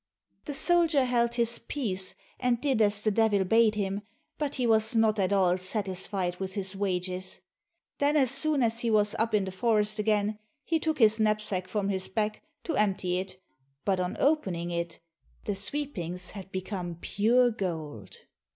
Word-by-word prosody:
The 290 - -3
soldier 330 -4 +3
held 235 -1 +1
his 235 -1 +1
peace, 190 -10 -2 0.2
and 250 -2 +1
did 265 -5 +1
as 205 -1 +3
the 215 - +2
Devil 210 -2 +3
bade 220 +3 +4
him, 200 -1 -2 0.4
but 290 -2 -2
he 250 - 0
was 220 0 +2
not 220 -1 +3
at 190 0 +1
all 185 -2 +3
satisfied 185 -1 -2
with 190 0 -5
his 195 -1 -4
wages. 185 -1 -3 0.6
Then 290 +2 +3
as 265 -4 +4
soon 280 0 +2
as 230 0 +1
he 235 -1 -1
was 210 -1 +3
up 225 0 +1
in 200 -2 +2
the 190 - -5
forest 215 +1 +1
again, 210 0 +1 0.2
he 325 -1 0
took 315 0 -1
his 220 -2 +4
knapsack 210 -4 0
from 200 +1 -1
his 190 -1 0
back, 210 +1 -2 0.2
to 330 - -2
empty 190 -3 +1
it, 185 0 -7 0.5
but 190 -2 +1
on 180 0 -2
opening 185 - +1
it, 170 -1 -3 0.5
the 205 - -1
sweepings 195 - -2
had 195 -2 -9
become 185 -3 -4
pure 240 +7 +3
gold. 160 - -5
210 Hz, 170 wpm, -28 LUFS, 185-235 Hz, 0.6 s, bade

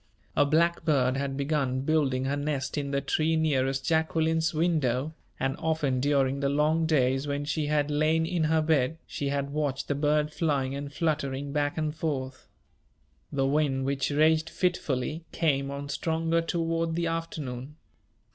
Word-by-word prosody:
A 145 - +4
blackbird 155 -4 +2
had 135 0 -2
begun 140 -3 0
building 135 -3 +1
her 140 +1 0
nest 145 -2 -2
in 145 -2 -2
the 140 0 0
tree 155 +3 +1
nearest 135 -4 +1
Jacqueline's 160 0 +1
window; 155 -4 0 0.3
and 135 0 0
often, 155 -5 0
during 140 0 +2
the 140 0 +1
long 155 +3 +2
days 135 -2 +2
when 145 0 -2
she 155 0 -1
had 150 0 +1
lain 155 +2 +2
in 165 -1 0
her 160 0 +2
bed, 155 -1 +1
she 140 - -3
had 140 0 -2
watched 140 -2 -2
the - - +1
bird 150 +1 +1
flying 140 -5 0
and 140 0 -5
fluttering 145 -3 -1
back 145 0 0
and 155 -1 -1
forth. 135 -5 -4 0.8
The 135 -1 +1
wind, 135 -2 +1
which 135 0 0
raged 155 +2 +3
fitfully, 160 -4 -1
came 140 -4 +1
on 140 0 -5
stronger 165 +3 0
toward 165 -1 -1
the 170 0 0
afternoon. 150 -5 -4
145 Hz, 155 wpm, -28 LUFS, 135-160 Hz, 0.8 s, A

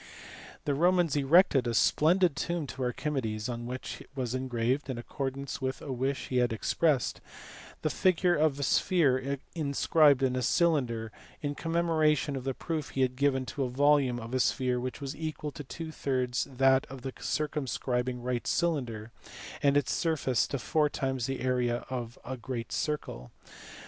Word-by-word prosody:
The 145 - +1
Romans 175 0 +3
erected 145 -2 +4
a 115 - -1
splendid 170 +6 +4
tomb 170 -3 -2
to 130 0 -7
Archimedes 125 -4 -2
on 120 -1 -4
which 130 +1 -6
was 125 -3 -2
engraved 130 +1 -1
(in 130 - -3
accordance 135 +3 -4
with 130 0 -2
a 140 - -6
wish 130 +2 -2
he 125 - 0
had 125 -1 +3
ex 110 - -2
pressed) 150 -7 +1 0.6
the - - +2
figure 180 -1 +3
of 150 -3 +2
a - - -1
sphere 140 -5 +2 0.2
inscribed 145 -2 +3
in 130 -1 +2
a 130 - 0
cylinder, 125 - +1 0.3
in 145 0 -1
com 165 +3 -4
memoration 155 -4 +2
of 130 -1 -5
the 135 -1 -1
proof 160 -3 -3
he 135 - -2
had 130 -1 +1
given 135 -1 +1
that 125 - -7
the 135 -3 0
volume 135 -1 +3
of 115 +2 -8
a 130 - +1
sphere 125 -1 +1
was 135 +3 -5
equal 155 -1 -4
to 145 - -8
two 160 +4 -7
thirds 130 -4 -1
that 135 0 +3
of 130 -2 -10
the 130 - -4
circumscribing 125 -4 -2
right 125 -1 -2
cylinder, 120 -10 -1 0.5
and 140 0 +4
its 145 - +1
surface 155 -7 +1
to 140 - -2
four 150 +6 +1
times 130 -4 -2
the 135 -2 -3
area 125 -2 0
of 120 -2 -4
a^great 125 -2 -5
circle. 105 - -3
135 Hz, 170 wpm, -30 LUFS, 125-150 Hz, 0.6 s, erected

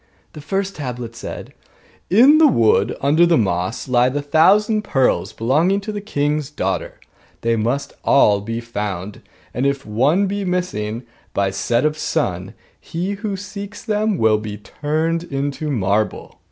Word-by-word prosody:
The 150 - -9
first 195 +6 -3
tablet 125 -5 -5
said: - - -8 0.6
'In 260 - +6
the 320 - +7
wood, 115 - +2
under 150 +5 +4
the 170 -1 +4
moss, 95 +3 -1
lie 125 0 +3
the 145 +2 -3
thousand 200 +9 +4
pearls 135 -10 +1
belonging 155 - +1
to 215 +2 -5
the 205 -1 -5
king's 150 -6 -1
daughter; - - -3 0.4
they 115 0 +1
must 125 +6 -1
all 105 -7 +4
be 115 +3 -4
found: 105 -4 -5 0.3
and 130 +3 0
if 140 0 -2
one 135 - +2
be 200 +1 -2
missing 175 - -2 0.3
by 100 -1 +1
set 120 +6 0
of 155 0 0
sun, - - -2 0.2
he 175 +4 -4
who 200 -1 -4
seeks 200 +1 -8
them 215 -2 0
will 110 -4 +3
be 105 -1 -6
turned 155 +9 -2
into 140 +1 -3
marble. 105 -4 -1
145 Hz, 155 wpm, -20 LUFS, 115-185 Hz, 0.6 s, the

